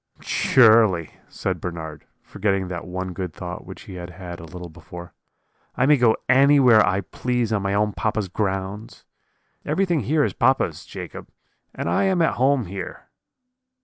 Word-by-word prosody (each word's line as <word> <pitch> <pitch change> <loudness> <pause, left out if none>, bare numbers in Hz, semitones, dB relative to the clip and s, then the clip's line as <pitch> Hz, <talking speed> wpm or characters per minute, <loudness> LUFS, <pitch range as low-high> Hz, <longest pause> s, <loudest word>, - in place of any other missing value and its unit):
"'Surely,' 110 - +4 0.2
said 90 -3 -3
Bernard, 80 -4 -6 0.2
forgetting 95 -2 -1
that 85 -1 -6
one 95 0 -4
good 90 -3 -5
thought 90 -1 -7
which - - -10
he - - -11
had 90 -1 -7
had 90 0 -9
a 80 - -9
little 90 +2 -9
before, 85 +1 -11 0.6
'I 125 - +2
may 150 +2 +6
go 120 -3 +3
anywhere 130 -4 +6
I 95 +2 +1
please 120 0 -2
on 100 - +1
my 100 0 -1
own 105 0 +1
papa's 110 -2 -1
grounds; 95 +2 -4 0.6
everything 170 +2 +1
here 145 +5 +1
is - - -1
papa's, 130 - +1
Jacob, - - -8 0.5
and - - -4
I 85 - +2
am 190 -2 +2
at 165 - +3
home 135 -2 +3
here.' 95 0 -8
100 Hz, 160 wpm, -23 LUFS, 90-125 Hz, 0.6 s, may